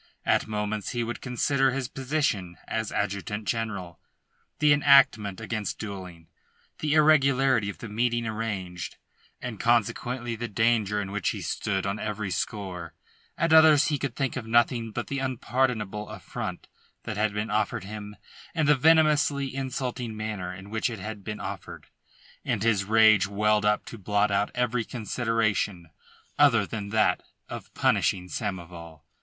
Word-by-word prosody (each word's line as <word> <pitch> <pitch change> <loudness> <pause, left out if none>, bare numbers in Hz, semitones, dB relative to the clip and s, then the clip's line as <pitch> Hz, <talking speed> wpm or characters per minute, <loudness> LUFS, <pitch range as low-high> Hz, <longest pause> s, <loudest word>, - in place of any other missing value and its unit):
At - - +2
moments 105 -1 -3
he 120 -1 -1
would 120 +1 -5
consider 135 +2 +1
his 130 -1 -2
position 130 - -1
as 110 -1 -2
adjutant 105 +1 -3
general, 100 -5 -3 0.6
the 150 -1 +5
enactment 135 -9 +4
against 105 -4 -3
duelling, 90 -6 -8 0.5
the 150 0 +1
irregularity 135 -7 +4
of 100 - -6
the 120 - -8
meeting 120 +2 0
arranged, 100 -6 -4 0.5
and, 125 -4 -5
consequently, 120 +1 0
the 120 +1 -4
danger 110 -1 +1
in 100 -1 -4
which 105 +1 -1
he - - -4
stood 95 -2 -2
on 100 +2 -2
every 105 -2 -3
score; 90 -2 -4 0.4
at 165 0 +2
others 160 -2 +7
he 145 -2 0
could 140 - -3
think 135 -2 -1
of 125 -4 -5
nothing 115 0 +2
but 120 +2 -3
the 140 - -3
unpardonable 125 -5 -1
affront 100 -5 -6 0.4
that 110 - -5
had 110 0 +1
been 105 +1 -3
offered 105 -2 0
him 105 +1 -8 0.4
and 155 -3 +1
the 150 - +7
venomously 150 -2 +3
insulting 130 -4 -3
manner 105 -4 -4
in 95 +2 -10
which 110 +2 0
it 115 - -5
had 105 +1 -7
been 105 +1 -5
offered, - - -7 0.6
and 110 -4 -1
his 105 -4 +2
rage 110 -3 +5
welled 105 +1 +2
up 105 0 +2
to 115 - -9
blot 105 +1 +1
out 100 +1 +1
every 125 -1 0
consideration 110 -7 -1 0.5
other 120 -8 +5
than 105 -1 -5
that 105 -4 +2 0.3
of - - -8
punishing 90 -1 +1
Samoval. 85 -6 -6
110 Hz, 150 wpm, -27 LUFS, 100-125 Hz, 0.6 s, others